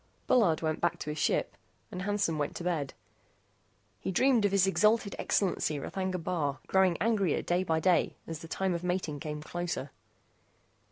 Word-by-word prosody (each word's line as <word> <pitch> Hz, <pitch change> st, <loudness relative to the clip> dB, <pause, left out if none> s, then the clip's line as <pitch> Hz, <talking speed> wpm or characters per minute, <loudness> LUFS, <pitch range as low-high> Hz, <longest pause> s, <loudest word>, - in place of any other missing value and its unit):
Bullard 200 Hz, -12 st, +3 dB
went 155 Hz, -1 st, -1 dB
back 170 Hz, -, +1 dB
to 150 Hz, -, -4 dB
his 150 Hz, -, -5 dB
ship, -, -, +1 dB, 0.4 s
and 180 Hz, -, -5 dB
Hansen 200 Hz, -5 st, 0 dB
went 145 Hz, -, -2 dB
to -, -, -5 dB
bed. 160 Hz, -6 st, -2 dB, 1.0 s
He -, -, -3 dB
dreamed 245 Hz, +2 st, +3 dB
of 200 Hz, -, +2 dB
His 195 Hz, -1 st, +4 dB
Exalted 210 Hz, +2 st, +2 dB
Excellency 175 Hz, -6 st, 0 dB
R'thagna 185 Hz, +5 st, -3 dB
Bar, 150 Hz, -6 st, -1 dB
growing 190 Hz, -3 st, +3 dB
angrier 200 Hz, -4 st, +1 dB
day 175 Hz, +1 st, +1 dB
by 160 Hz, -3 st, +1 dB
day 180 Hz, +1 st, +2 dB
as 165 Hz, -2 st, -6 dB
the 165 Hz, -, -9 dB
time 190 Hz, +2 st, -1 dB
of 170 Hz, 0 st, -3 dB
mating 180 Hz, -5 st, -2 dB
came 150 Hz, +1 st, -5 dB
closer. 175 Hz, -4 st, -4 dB
175 Hz, 170 wpm, -30 LUFS, 160-195 Hz, 1.0 s, His